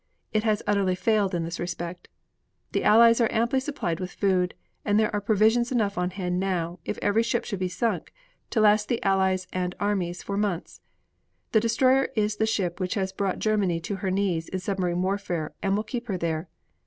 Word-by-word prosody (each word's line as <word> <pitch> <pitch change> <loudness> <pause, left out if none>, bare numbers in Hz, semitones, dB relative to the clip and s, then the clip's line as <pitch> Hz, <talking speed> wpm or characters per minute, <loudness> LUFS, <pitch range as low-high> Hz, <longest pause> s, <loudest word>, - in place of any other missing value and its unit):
It 215 0 +2
has 215 -2 +1
utterly 200 -3 +2
failed 205 -1 +1
in 170 - -1
this 170 +1 -5
respect. 175 0 -5 0.6
The - - 0
Allies 230 +2 +6
are 230 - +2
amply 235 +4 +2
supplied 260 - -3
with 185 -1 -4
food, 185 -3 +1 0.3
and 205 0 +2
there 215 0 +1
are 205 - 0
provisions 220 +4 +3
enough 215 -5 +1
on 180 0 0
hand 180 -1 -2
now, 180 -2 -2
if - - -4
every 205 +2 +3
ship 230 0 -1
should 200 -4 -4
be 185 - 0
sunk, 230 +5 -2 0.4
to 230 - 0
last 210 0 +4
the 235 - 0
Allies 190 -1 +2
and 180 0 -2
armies 185 -4 -1
for 200 - -3
months. 200 -5 -2 0.7
The 220 - +5
destroyer 255 +4 +3
is 210 -1 0
the 220 - +1
ship 180 -5 -1
which 185 -1 -1
has 190 -2 -1
brought 195 -1 -1
Germany 205 -6 +1
to 195 +4 -4
her 190 0 -2
knees 185 -4 0
in 190 - -3
submarine 185 -2 -1
warfare 185 -5 -2
and 195 0 +1
will 210 - 0
keep 240 +2 -5
her 195 -4 -1
there. 165 -1 -2
200 Hz, 200 wpm, -26 LUFS, 180-215 Hz, 0.7 s, Allies